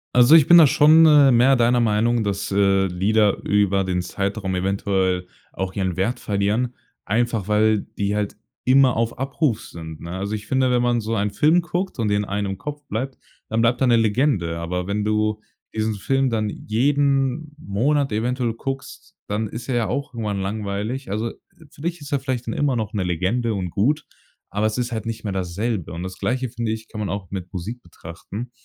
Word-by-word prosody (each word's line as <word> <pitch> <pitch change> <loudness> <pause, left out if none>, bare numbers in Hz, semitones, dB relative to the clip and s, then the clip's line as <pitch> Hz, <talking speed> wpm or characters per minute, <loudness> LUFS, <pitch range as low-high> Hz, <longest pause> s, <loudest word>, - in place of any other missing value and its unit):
Also 125 +5 +7
ich 160 -4 +7
bin 175 - +9
da 160 -3 +8
schon, 150 +3 +6
äh, 145 -3 +7
mehr 125 +3 +5
deiner 120 0 +3
Meinung, 115 +1 +2
dass, 100 0 -2
äh, 95 -1 +3
Lieder 100 +3 +2
über 100 -1 +2
den 90 -1 -1
Zeitraum 95 +1 -3
eventuell 95 -1 0 0.3
auch 95 0 -4
ihren 95 -3 -1
Wert 115 +7 -1
verlieren, 105 +5 0 0.3
einfach 115 -1 0
weil 110 0 +3 0.2
die 100 0 0
halt 105 -1 -2 0.3
immer 130 -1 +5
auf 115 0 -1
Abruf 135 -2 -1
sind, 80 -2 -9
ne? 85 - -7
Also 95 +3 -4
ich 105 - -8
finde, 130 -1 +2
wenn 125 -1 +2
man 120 -1 +2
so 115 +1 -2
ein 100 -1 0
Film 155 +11 +3
guckt 175 +2 -3
und 110 -3 0
den 105 0 +1
einen 100 0 -2
im 95 - -5
Kopf 145 +5 -6
bleibt, 130 +5 -3 0.3
dann 110 +1 0
bleibt 120 +1 +2
da 130 - +3
'ne 120 - +5
Legende. 110 - +1
Aber 90 +2 -3
wenn 100 +2 -2
du 110 0 0 0.3
diesen 110 0 -1
Film 135 +6 0
dann 110 -2 -1
jeden 140 +6 0
Monat 140 +3 0
eventuell 120 +2 -1
guckst, 135 +3 -7
dann 105 +2 -1
ist 120 +4 -8
er 130 - 0
ja 115 -3 +1
auch 140 +6 -3
irgendwann 105 -4 -3
langweilig. 105 +5 -3
Also, 110 +4 -2
äh, - - -10 0.4
für - - -15
dich 170 -1 -3
ist 145 +1 -9
er 140 - +1
vielleicht 130 -3 -3
dann 115 - -2
immer 145 -3 +1
noch 110 -3 -2
'ne 105 -4 -2
Legende 95 +7 0
und 95 -3 -3
gut, 140 - 0 0.4
aber 105 +2 -1
es 110 +1 0
ist 120 0 -2
halt 110 -2 -4
nicht 115 0 -5
mehr 105 - -3
dasselbe. 95 +1 -3
Und 85 +2 -5
das 95 0 -7
Gleiche, 130 0 -1
finde 115 -1 -3
ich, 110 0 -8
kann 110 - -7
man 105 -2 -2
auch 95 -3 -5
mit 95 -2 -6
Musik 105 +7 -5
betrachten. 90 +7 -9
110 Hz, 205 wpm, -22 LUFS, 100-125 Hz, 0.4 s, bin